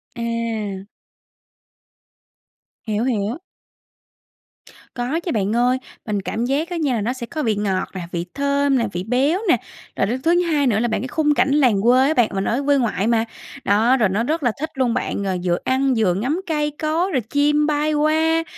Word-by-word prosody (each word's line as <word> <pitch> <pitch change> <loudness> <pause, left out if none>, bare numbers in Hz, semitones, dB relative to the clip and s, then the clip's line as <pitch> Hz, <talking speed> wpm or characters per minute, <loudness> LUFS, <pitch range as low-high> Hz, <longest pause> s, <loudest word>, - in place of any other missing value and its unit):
À. 230 -4 -3 2.0
Hiểu, 215 0 -1
hiểu. 235 0 -1 1.6
Có 250 +6 -1
chứ 345 0 -4
bạn 210 0 0
ơi. 245 +2 +3 0.3
Mình 210 -2 -1
cảm 225 +4 -2
giác 285 +6 -1
á 350 - -3
nha 290 -6 0
là 220 - -1
nó 235 +5 -1
sẽ 255 -2 -6
có 305 +5 -4
vị 220 -3 +1
ngọt 200 -2 -1
nè, 185 - -5
vị 170 0 -3
thơm 280 -1 +1
nè, 230 -3 0
vị 175 0 -4
béo 265 - +1
nè. - - +5 0.4
Rồi 195 - +1
đến 250 +4 -2
thứ 340 +3 +3
hai 305 -5 +1
nữa 215 -4 +2
là, 240 - +1
bạn 220 - -1
cái 260 - -4
khung 300 +3 +1
cảnh 280 - +2
làng 250 -9 +3
quê 255 +4 +4
á 310 - +2
bạn, 240 -6 +3
mình 195 0 -1
ở 250 +7 0
quê 285 0 +4
ngoại 225 -5 0
mà. 230 -1 +2 0.4
Đó, 225 +6 +3
rồi 215 -6 +2
nó 205 +5 0
rất 310 +4 -1
là 245 - +3
thích 315 +2 -3
luôn 255 -3 +1
bạn, 200 - -2
rồi 190 -2 -1
vừa 175 -1 +1
ăn 265 0 +1
vừa 205 -5 +2
ngắm 260 - -1
cây 300 -2 0
cối, 330 +5 0
rồi 260 - +1
chim 295 +6 +1
bay 300 0 +1
qua. 320 +2 +2
250 Hz, 205 wpm, -21 LUFS, 220-295 Hz, 2.0 s, nè